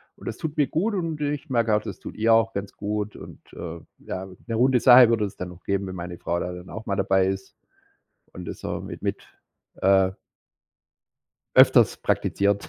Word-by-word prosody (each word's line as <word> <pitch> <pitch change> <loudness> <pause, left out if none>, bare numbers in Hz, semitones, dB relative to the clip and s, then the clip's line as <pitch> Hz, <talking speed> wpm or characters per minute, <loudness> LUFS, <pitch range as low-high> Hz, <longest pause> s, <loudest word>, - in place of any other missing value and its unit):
und - - -13
das - - -4
tut 155 -1 -5
mir 145 - +3
gut 200 - 0
und 165 -5 -3
ich 145 +1 -3
merke 115 -4 +2
auch, 105 - +1
das - - -7
tut - - -9
ihr 115 +1 +3
auch 115 0 +3
ganz 100 0 -5
gut 105 0 -3
und, - - -11
äh, 85 0 -7 0.3
ja 95 +1 -5 0.2
'ne 115 - -2
runde 125 +2 +4
Sache 125 -1 +8
würde 115 -2 +2
es 100 - -7
dann 90 - -5
noch 90 0 -14
geben, 100 0 -1
wenn 95 - -6
meine 85 0 -6
Frau 85 +1 -2
da 90 - -3
dann 90 0 -9
auch 110 0 -7
mal 100 - 0
dabei 95 -1 +2
ist 95 0 -4 0.8
und 90 -1 -9
das - - -8
auch - - -3
mit - - -8
mit, - - -2 0.6
äh 95 -1 +4 1.4
öfters - - +6
praktiziert. 100 0 0
105 Hz, 205 wpm, -24 LUFS, 95-120 Hz, 1.4 s, Sache